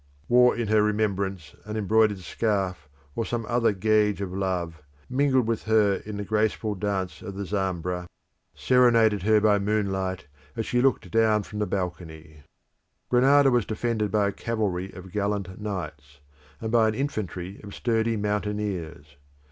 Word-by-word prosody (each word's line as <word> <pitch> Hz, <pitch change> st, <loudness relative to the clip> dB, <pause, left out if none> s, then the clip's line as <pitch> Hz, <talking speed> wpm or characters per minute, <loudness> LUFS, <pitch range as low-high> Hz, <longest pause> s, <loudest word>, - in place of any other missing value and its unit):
wore 125 Hz, 0 st, +5 dB
in 120 Hz, -2 st, -2 dB
her 105 Hz, 0 st, +4 dB
remembrance 100 Hz, -6 st, -1 dB
an 105 Hz, +1 st, -5 dB
embroidered 110 Hz, 0 st, +3 dB
scarf 95 Hz, -6 st, -2 dB, 0.3 s
or 115 Hz, -, -1 dB
some 115 Hz, 0 st, -3 dB
other 120 Hz, 0 st, +2 dB
gage 105 Hz, 0 st, +2 dB
of 95 Hz, -2 st, -4 dB
love, 90 Hz, -4 st, -2 dB, 0.3 s
mingled 130 Hz, -2 st, +2 dB
with 115 Hz, -1 st, -1 dB
her 105 Hz, -3 st, +3 dB
in 105 Hz, -1 st, -5 dB
the 100 Hz, -, -3 dB
graceful 110 Hz, +1 st, 0 dB
dance 95 Hz, -2 st, -3 dB
of 100 Hz, -, -7 dB
the 100 Hz, 0 st, -4 dB
Zambra, 90 Hz, -2 st, -2 dB, 0.5 s
serenaded 115 Hz, -5 st, +4 dB
her 110 Hz, +3 st, +4 dB
by 105 Hz, -1 st, +3 dB
moonlight 95 Hz, -3 st, -1 dB, 0.3 s
as 115 Hz, -2 st, -2 dB
she 125 Hz, -, +1 dB
looked 130 Hz, -9 st, +1 dB
down 110 Hz, -1 st, +3 dB
from 105 Hz, +1 st, -7 dB
the 105 Hz, -, 0 dB
balcony. 85 Hz, -4 st, -5 dB, 0.7 s
Granada 135 Hz, +2 st, +5 dB
was 120 Hz, -2 st, +3 dB
defended 110 Hz, 0 st, -1 dB
by 105 Hz, -1 st, +2 dB
a -, -, -5 dB
cavalry 100 Hz, -5 st, -2 dB
of 95 Hz, 0 st, -11 dB
gallant 100 Hz, -1 st, -2 dB
knights, 75 Hz, -9 st, -6 dB, 0.4 s
and 110 Hz, -1 st, -4 dB
by 115 Hz, -2 st, +4 dB
an 110 Hz, -, -1 dB
infantry 100 Hz, -8 st, -4 dB
of 100 Hz, -1 st, -9 dB
sturdy 115 Hz, -1 st, 0 dB
mountaineers. 100 Hz, -8 st, -3 dB
105 Hz, 155 wpm, -26 LUFS, 95-110 Hz, 0.7 s, wore